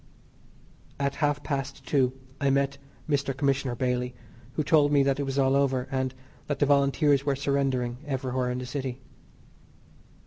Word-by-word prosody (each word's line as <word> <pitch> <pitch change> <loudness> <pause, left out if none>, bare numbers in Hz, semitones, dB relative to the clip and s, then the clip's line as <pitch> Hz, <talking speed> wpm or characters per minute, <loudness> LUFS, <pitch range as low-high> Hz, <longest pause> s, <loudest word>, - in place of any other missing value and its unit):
At 140 0 0
half 145 -1 +1
past 135 -1 -3
two 130 -1 +2 0.3
I 140 - +2
met 140 0 +1 0.3
Mr. 140 -3 0
Commissioner 135 -3 +1
Bailey, 125 0 -1 0.4
who 155 - 0
told 145 -1 +4
me 140 -1 +5
that 135 0 +1
it - - 0
was 135 0 -2
all 135 0 +3
over, 135 -2 +1
and 130 -1 -1 0.3
that 145 - -1
the 145 - +3
Volunteers 140 0 +3
were 140 -1 +1
surrendering 135 -3 0
everywhere 130 -2 -1
in 125 - -2
the 125 - -4
city. 130 -1 -4
135 Hz, 160 wpm, -27 LUFS, 130-140 Hz, 0.4 s, me